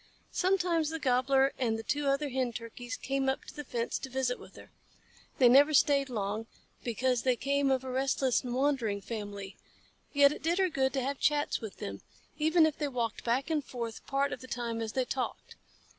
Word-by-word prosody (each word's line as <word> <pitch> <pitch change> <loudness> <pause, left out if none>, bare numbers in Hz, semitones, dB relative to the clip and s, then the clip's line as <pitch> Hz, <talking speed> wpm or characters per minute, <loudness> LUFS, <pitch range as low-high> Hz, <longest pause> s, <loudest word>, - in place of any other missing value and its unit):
Sometimes 355 -4 +1
the 325 - -3
Gobbler 270 -1 +3
and 230 -4 +1
the 225 - -6
two 290 +4 -1
other 275 +1 +1
Hen 255 -2 -1
Turkeys 240 +2 -6
came 270 0 -1
up 265 - -2
to - - -10
the 295 - -5
fence 235 -3 -2
to 265 - -6
visit 260 -1 -1
with - - -14
her. - - -13 0.7
They 255 - +6
never 285 +5 +6
stayed 275 -1 +4
long, 215 -1 -3 0.4
because 245 +1 0
they 255 -1 +2
came 280 +3 +1
of 260 -1 +1
a 260 - -5
restless 265 -1 +1
and 245 -1 -3
wandering 255 -7 +1
family, 205 -2 -6 0.5
yet 285 -1 +6
it - - -6
did 335 +4 +1
her 380 -1 +3
good 265 -4 +1
to 265 -2 0
have 275 +1 -2
chats 295 0 +1
with 220 -3 -7
them, - - -6 0.4
even 320 +2 +5
if 310 -2 -1
they 295 - 0
walked 240 -5 -3
back 255 +6 0
and 305 -2 +1
forth 235 -3 -6
part 280 +1 0
of - - -7
the 255 - -10
time 235 -2 -3
as 220 -1 -4
they 260 -1 +1
talked. 255 0 -4
265 Hz, 205 wpm, -31 LUFS, 240-280 Hz, 0.7 s, They